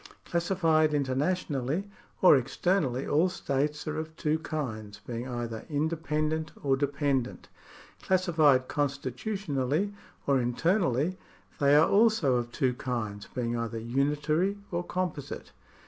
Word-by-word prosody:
Classified 165 -3 +2
internationally 145 +3 -1 0.4
or 180 - +9
externally, 135 0 0
all 160 +5 +3
states 150 -4 -2
are 155 0 -2
of 160 0 -6
two 155 0 0
kinds, 110 -10 -5
being 120 +1 -4
either 120 -3 -4
indepen 155 0 0
dent 160 0 -2
or 135 -2 +3
dependent. 140 -2 -1 0.5
Classified 160 -8 +3
constitutionally 145 - -1 0.3
or 140 -2 +3
internally, 165 - +1 0.4
they 140 0 +5
are 155 +2 +6
also 200 - +4
of 120 0 -3
two 130 -1 +1
kinds, 110 -5 -4
being 120 -1 -1
either 115 -1 -3
unitary 150 - 0
or 175 0 -1
composite. 180 -6 -4
145 Hz, 115 wpm, -29 LUFS, 130-165 Hz, 0.5 s, or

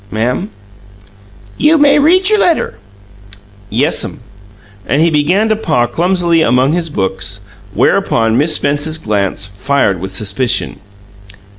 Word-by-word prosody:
"Ma'am?" 125 - -2 1.1
"You 310 +3 +4
may 290 0 +4
read 365 +6 +3
your 425 0 +3
letter." 340 -5 0 0.9
"Yes'm." - - 0 0.7
And 140 - +1
he 165 +1 +3
began 170 +9 +1
to 220 - +2
paw 155 - 0
clumsily 170 +5 +1
among 130 +1 +2
his 170 -1 -2
books, 95 -4 -3 0.3
whereupon 115 - +1
Miss 150 +5 +2
Spence's 145 +2 -1
glance 100 -6 -2
fired 100 0 -1
with 95 0 -7
suspicion. 110 +5 -1
145 Hz, 120 wpm, -13 LUFS, 110-185 Hz, 1.1 s, You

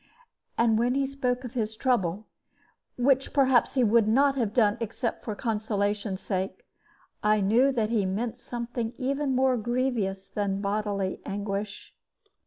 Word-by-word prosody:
And 225 -1 +3
when 245 +2 +1
he 275 0 +2
spoke 255 -2 -2
of 245 -1 -7
his 220 -3 -2
own - - -24
trouble 210 -6 0 0.7
(which, 265 +1 +2
perhaps, 265 -3 +3
he 255 - +3
would 225 -1 +4
not 275 +5 +4
have 235 -6 0
done 215 -3 +3
except 230 +1 -3
for 215 - -4
consolation's 210 -3 -1
sake), 195 - -3 0.6
I 210 0 +3
knew 230 +8 +4
that 225 -3 0
he 210 -5 +1
meant 225 +5 -3
something 240 -1 -4
even 275 +1 -1
more 260 -1 +3
grievous 230 -5 -1
than 195 0 -2
bodily 200 -1 -2
anguish. 200 0 -4
225 Hz, 150 wpm, -27 LUFS, 205-255 Hz, 0.7 s, would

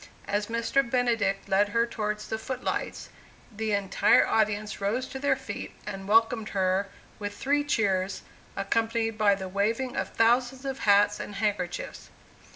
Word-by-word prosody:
As 205 +1 -1
Mr. 230 +4 +1
Benedict 235 -6 0
led 200 +1 +3
her 230 +3 +2
towards 210 -2 -3
the 220 - -3
foot 255 +2 -5
lights, - - -3 0.5
the 220 0 -2
entire 200 0 +4
audience 215 -1 0
rose 225 +6 0
to 265 - -6
their 285 0 +2
feet 260 -6 -7
and 195 -2 -6
welcomed 225 +1 +3
her 190 +1 +1 0.3
with 205 -1 -5
three 290 +2 +1
cheers, 195 -8 0 0.3
accompanied 225 +2 0
by 210 -2 +4
the 190 -1 -6
waving 225 +7 -1
of - - -2
thousands 245 +3 +2
of 270 -1 -3
hats 205 0 +4
and 205 - -6
handkerchiefs. 195 -4 -3
215 Hz, 155 wpm, -27 LUFS, 200-235 Hz, 0.5 s, entire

